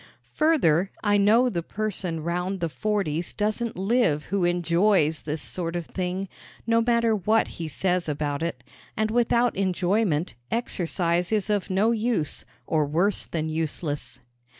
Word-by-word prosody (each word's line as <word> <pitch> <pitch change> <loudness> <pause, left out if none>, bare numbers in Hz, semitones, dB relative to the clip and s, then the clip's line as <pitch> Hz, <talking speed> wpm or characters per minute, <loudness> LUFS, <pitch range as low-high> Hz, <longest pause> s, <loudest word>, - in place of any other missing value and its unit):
Further, 195 - +3
I 205 -1 +3
know 220 +5 +4
the 180 -8 -1
person 180 -4 -3
round 180 +3 -2
the 170 -1 -1
forties 170 +1 -2
doesn't 215 +1 -1
live 195 -6 +1
who 195 -3 +2
enjoys 175 -1 +2
this 150 0 -3
sort 170 -2 -3
of 175 -1 -3
thing 185 +2 -3 0.4
no 230 0 +3
matter 235 -1 +2
what 215 +3 +2
he 165 - -6
says 180 +3 0
about 145 0 -2
it; 165 -7 -3 0.3
and 215 0 0
without 240 +1 +2
enjoyment 185 - 0 0.2
exercise 175 -5 -1
is 215 -1 +1
of 205 -2 0
no 200 +4 +2
use 225 -8 -1 0.2
or 155 -2 +1
worse 175 +7 +1
than 160 -1 -3
useless. 155 -1 -3
185 Hz, 145 wpm, -25 LUFS, 165-215 Hz, 0.4 s, know